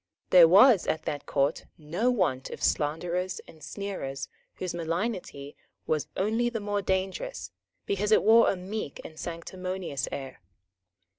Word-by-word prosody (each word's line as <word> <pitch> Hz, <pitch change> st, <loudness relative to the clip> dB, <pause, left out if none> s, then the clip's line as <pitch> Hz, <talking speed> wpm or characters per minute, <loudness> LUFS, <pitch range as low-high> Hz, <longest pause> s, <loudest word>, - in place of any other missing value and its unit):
There 175 Hz, -3 st, +9 dB
was 205 Hz, +4 st, +6 dB
at 160 Hz, -, -1 dB
that 145 Hz, -, -4 dB
Court 140 Hz, +2 st, 0 dB
no 170 Hz, +10 st, -1 dB
want 180 Hz, -, 0 dB
of -, -, -8 dB
slanderers 175 Hz, +5 st, 0 dB
and 160 Hz, -, -15 dB
sneerers 140 Hz, -9 st, -5 dB, 0.3 s
whose 185 Hz, -2 st, -4 dB
malignity 170 Hz, -4 st, -3 dB, 0.3 s
was 155 Hz, -2 st, -1 dB
only 225 Hz, +5 st, +1 dB
the 235 Hz, -2 st, -3 dB
more 205 Hz, 0 st, -1 dB
dangerous 190 Hz, -, -2 dB, 0.3 s
because 205 Hz, +2 st, -1 dB
it -, -, +5 dB
wore 225 Hz, +2 st, +6 dB
a -, -, +1 dB
meek 190 Hz, -2 st, -5 dB
and 155 Hz, 0 st, -10 dB
sanctimonious 180 Hz, -2 st, -4 dB
air. 135 Hz, -7 st, -7 dB
185 Hz, 140 wpm, -28 LUFS, 155-205 Hz, 0.3 s, There